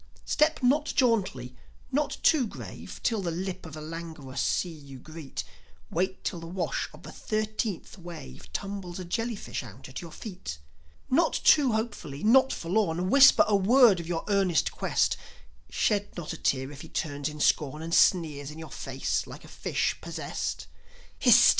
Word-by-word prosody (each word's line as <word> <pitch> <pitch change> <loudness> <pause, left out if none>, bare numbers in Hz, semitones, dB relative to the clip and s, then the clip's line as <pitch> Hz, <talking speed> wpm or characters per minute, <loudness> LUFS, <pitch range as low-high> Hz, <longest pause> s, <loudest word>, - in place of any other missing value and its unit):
Step 305 -2 +2
not 290 +5 +4
jauntily, 190 - +1 0.4
not 290 +2 0
too 285 -7 +4
grave, - - -9
Till 225 -4 +1
the 180 - -2
lip 180 +1 -4
of 160 - -11
the 155 - -7
languorous 160 -4 -6
sea 180 - 0
you 140 -4 -11
greet; 155 +2 -7 0.5
Wait 190 +3 -1
till 175 - -2
the 165 - -8
wash 180 +1 -2
of - - -15
the - - -9
thirteenth 215 -3 -3
wave 70 - -10
Tumbles 195 - -5
a 185 - -6
jellyfish 225 +4 -3
out 120 -1 -11
at 130 - -7
your 170 -2 -9
feet. 180 - -7 0.5
Not 310 +7 +3
too 275 -6 +6
hopefully, 205 - -3
not 260 +5 +6
forlorn, 180 0 0
Whisper 280 0 +8
a 210 - +3
word 215 0 +6
of 170 - -6
your 170 -2 -2
earnest 195 -4 +2
quest; - - +1 0.5
Shed 205 -2 0
not 170 -3 -4
a - - -6
tear 130 +1 0
if 145 -1 -10
he 160 - -10
turns 145 -2 -2
in 150 0 -9
scorn 150 +1 +2
And 165 +1 -4
sneers 150 -7 +3
in 150 - -9
your 160 -1 -9
face 135 0 -2
like - - -10
a - - -12
fish - - -1
possessed. - - -4 0.5
Hist! - - +7
175 Hz, 170 wpm, -28 LUFS, 150-215 Hz, 0.5 s, Whisper